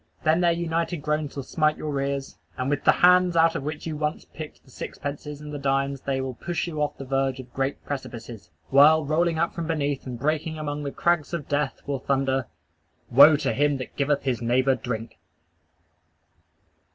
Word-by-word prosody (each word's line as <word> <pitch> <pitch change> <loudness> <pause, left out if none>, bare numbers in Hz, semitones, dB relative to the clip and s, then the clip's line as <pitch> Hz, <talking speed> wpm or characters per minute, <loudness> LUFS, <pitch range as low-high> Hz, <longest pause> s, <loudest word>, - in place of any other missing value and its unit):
Then 160 +2 +3
their 175 -1 +4
united 170 0 -1
groans 150 -1 -1
will 140 - -4
smite 155 +2 +1
your 145 -3 -2
ears; 140 0 -3 0.2
and 130 +2 -1
with 145 - -1
the - - +8
hands 180 -1 +5
out 165 0 +4
of - - -2
which 150 +2 -5
you 160 -2 -3
once 150 +1 -2
picked 155 -1 -10
the 130 - -20
sixpences 145 +2 -6
and 150 0 -8
the 145 - -4
dimes, 135 0 0
they 135 -1 -1
will 130 -1 -4
push 170 +6 -3
you 155 -3 -4
off 150 - -1
the 135 - -7
verge 135 0 0
of 125 -1 -11
great 135 +1 -2
precipices; 120 -8 -7 0.2
while, 150 +3 +6
rolling 165 +3 +1
up 170 +1 0
from 170 -2 -4
beneath, 145 -4 -1
and 125 -2 -5
breaking 155 +4 -1
among 150 -1 -3
the 140 -1 -4
crags 170 0 +1
of 150 -5 -6
death, 145 -1 -1
will 140 -2 -2
thunder: 135 -2 0 0.7
"_Woe 145 +3 +8
to - - 0
him 145 0 +2
that 130 - -8
giveth 140 0 +1
his 125 -4 -1
neighbor 130 +3 +3
drink! 115 -2 -5
145 Hz, 195 wpm, -25 LUFS, 135-155 Hz, 0.7 s, the